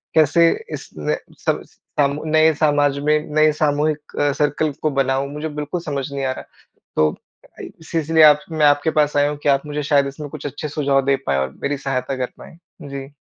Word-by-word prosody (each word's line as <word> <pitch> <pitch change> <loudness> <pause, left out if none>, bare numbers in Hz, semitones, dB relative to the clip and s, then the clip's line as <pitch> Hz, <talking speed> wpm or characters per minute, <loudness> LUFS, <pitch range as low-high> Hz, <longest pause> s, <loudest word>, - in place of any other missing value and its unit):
कैसे 165 +2 +5 0.2
इस - - -7
नए - - -1 0.3
सब - - +1
समू 145 +1 -2
नए 155 0 +5
समाज 145 -2 +2
में, 150 +1 +2 0.2
नए 155 0 +5
सामूहिक 150 0 +1 0.4
सर्किल 150 +1 +1
को 155 - +2
बनाऊँ, 135 0 0
मुझे 150 +2 -4
बिल्कुल 150 +3 -4
समझ 140 -4 -4
नहीं 140 -1 -2
आ 130 - 0
रहा। 130 - -6 0.5
तो, 75 0 +3 0.3
अ, - - -18
इ - - -6
इसी 160 - -17
सी 165 - +1
इसीलिए 160 +1 +4
आप 150 -1 +8
मैं 155 -2 +2
आपके 145 +2 +3
पास 150 0 +2
आया 145 0 +3
हूँ 150 - -4
कि 145 - +2
आप 140 +1 +2
मुझे 150 0 -3
शायद 140 -1 +3
इसमें 145 +2 -7
कुछ 150 0 -9
अच्छे 145 +2 -4
सुझाव 140 -2 +1
दे 140 - +3
पाएँ 70 -1 +2
और 65 0 -2
मेरी 140 0 0
सहायता 135 -1 -2
कर - - -15
पाएँ। 165 - -13 0.3
जी। 140 0 -7
145 Hz, 215 wpm, -20 LUFS, 140-155 Hz, 0.5 s, आप